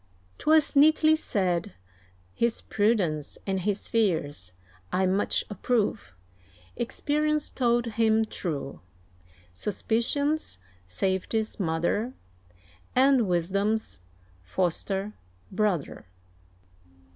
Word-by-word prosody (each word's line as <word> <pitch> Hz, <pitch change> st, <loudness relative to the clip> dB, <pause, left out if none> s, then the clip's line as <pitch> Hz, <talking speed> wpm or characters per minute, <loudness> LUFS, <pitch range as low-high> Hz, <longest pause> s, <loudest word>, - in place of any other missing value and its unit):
'Twas 310 Hz, -1 st, +3 dB
neatly 310 Hz, +2 st, +6 dB
said, 185 Hz, -, -1 dB, 0.6 s
his 235 Hz, -1 st, 0 dB
prudence 195 Hz, -9 st, 0 dB
and 190 Hz, -1 st, -1 dB
his 200 Hz, +2 st, -2 dB
fears 160 Hz, -, 0 dB, 0.4 s
I 190 Hz, +1 st, +2 dB
much 190 Hz, +2 st, +1 dB
approve; 205 Hz, -, -1 dB, 0.6 s
Experience 300 Hz, +5 st, -1 dB
told 240 Hz, -2 st, +1 dB
him 225 Hz, -1 st, +2 dB
true, 150 Hz, -10 st, -5 dB, 0.7 s
Suspicion's 235 Hz, -, -1 dB, 0.3 s
Safety's 190 Hz, -, -1 dB
mother, 175 Hz, +7 st, 0 dB, 0.8 s
And 260 Hz, -3 st, +4 dB
Wisdom's 195 Hz, -, -1 dB, 0.4 s
foster 190 Hz, -, -2 dB, 0.4 s
brother. 195 Hz, -, -1 dB
210 Hz, 75 wpm, -27 LUFS, 175-235 Hz, 0.8 s, neatly